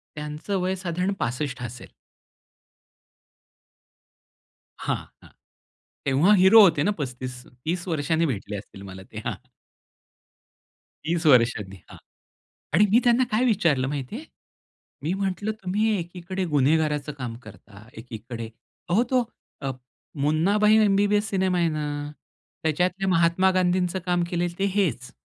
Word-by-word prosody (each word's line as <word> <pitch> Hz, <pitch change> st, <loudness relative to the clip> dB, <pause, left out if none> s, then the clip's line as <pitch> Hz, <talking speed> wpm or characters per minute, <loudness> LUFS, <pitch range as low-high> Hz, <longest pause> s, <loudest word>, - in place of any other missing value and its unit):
त्यांचं 150 Hz, +6 st, -4 dB
वय 185 Hz, +1 st, 0 dB
साधारण 180 Hz, +1 st, -2 dB
65 130 Hz, +1 st, -3 dB
असेल. 120 Hz, +1 st, -8 dB, 2.9 s
हां, -, -, -1 dB, 0.3 s
हां. -, -, -16 dB, 0.7 s
तेव्हा 145 Hz, +8 st, +4 dB
हिरो 190 Hz, +4 st, +7 dB
होते 170 Hz, -5 st, +4 dB
ना 205 Hz, -, +2 dB
35 125 Hz, -1 st, -6 dB
30 165 Hz, +9 st, -4 dB
वर्षांनी 160 Hz, +1 st, +1 dB
भेटले 105 Hz, -5 st, -4 dB
असतील 100 Hz, 0 st, -10 dB
मला 95 Hz, 0 st, -10 dB
ते, 110 Hz, -, -11 dB
हां. -, -, -2 dB, 1.7 s
30 165 Hz, +1 st, -1 dB
वर्षांनी, 115 Hz, -7 st, +3 dB
हां. -, -, -11 dB, 0.8 s
आणि 205 Hz, +5 st, +6 dB
मी 235 Hz, -, +6 dB
त्यांना 240 Hz, +1 st, +4 dB
काय 220 Hz, +4 st, +2 dB
विचारलं 165 Hz, -, +2 dB
माहिती 140 Hz, -, -4 dB
आहे? 295 Hz, +7 st, -7 dB, 0.8 s
मी 165 Hz, +5 st, 0 dB
म्हटलं 195 Hz, +2 st, -2 dB
तुम्ही 210 Hz, +4 st, +1 dB
एकीकडे 180 Hz, +2 st, -5 dB
गुन्हेगाराचं 150 Hz, 0 st, +1 dB
काम 125 Hz, -4 st, -5 dB
करता, 105 Hz, 0 st, -14 dB
एकीकडे 115 Hz, 0 st, -7 dB, 0.4 s
अहो 200 Hz, +7 st, +3 dB
तो 255 Hz, -2 st, +3 dB, 0.4 s
अ, 135 Hz, -1 st, -2 dB, 0.5 s
मुन्नाभाई 195 Hz, +9 st, +3 dB
एमबीबीएस 205 Hz, +1 st, +2 dB
सिनेमा 190 Hz, -2 st, +1 dB
आहे 170 Hz, -1 st, +2 dB
ना, 155 Hz, -1 st, -3 dB, 0.8 s
त्याच्यातल्या 180 Hz, +5 st, 0 dB
महात्मा 175 Hz, +2 st, +3 dB
गांधींचं 185 Hz, 0 st, +1 dB
काम 175 Hz, -1 st, +1 dB
केलेलं 175 Hz, 0 st, -2 dB
ते 195 Hz, -, +2 dB
हेच. 145 Hz, -, 0 dB
170 Hz, 125 wpm, -25 LUFS, 130-190 Hz, 2.9 s, हिरो